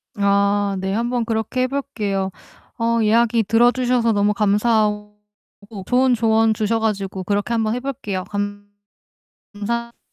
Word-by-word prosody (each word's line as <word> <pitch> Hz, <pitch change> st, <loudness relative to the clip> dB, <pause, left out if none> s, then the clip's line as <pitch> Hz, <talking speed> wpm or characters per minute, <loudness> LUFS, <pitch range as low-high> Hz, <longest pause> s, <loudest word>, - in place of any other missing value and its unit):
아. 200 Hz, 0 st, +1 dB
네 190 Hz, +1 st, -2 dB
한번 240 Hz, +2 st, -1 dB
그렇게 225 Hz, +2 st, -2 dB
해 255 Hz, -, +2 dB
볼게요. 210 Hz, -9 st, -3 dB, 0.5 s
어 230 Hz, 0 st, +1 dB
이야기 230 Hz, +1 st, +3 dB
들어 230 Hz, +4 st, +4 dB
주셔서 245 Hz, -2 st, +1 dB
너무 205 Hz, 0 st, +2 dB
감사하고 210 Hz, 0 st, +1 dB, 0.7 s
좋은 255 Hz, +1 st, +3 dB
조언 225 Hz, -1 st, +3 dB
주셔가지고 210 Hz, -3 st, -1 dB
그렇게 205 Hz, +4 st, -1 dB
한번 220 Hz, -1 st, 0 dB
해 250 Hz, -, -2 dB
볼게요. 210 Hz, -8 st, -4 dB
감 205 Hz, 0 st, -4 dB, 0.9 s
감사 235 Hz, +3 st, -4 dB
220 Hz, 280 characters per minute, -20 LUFS, 205-235 Hz, 0.9 s, 들어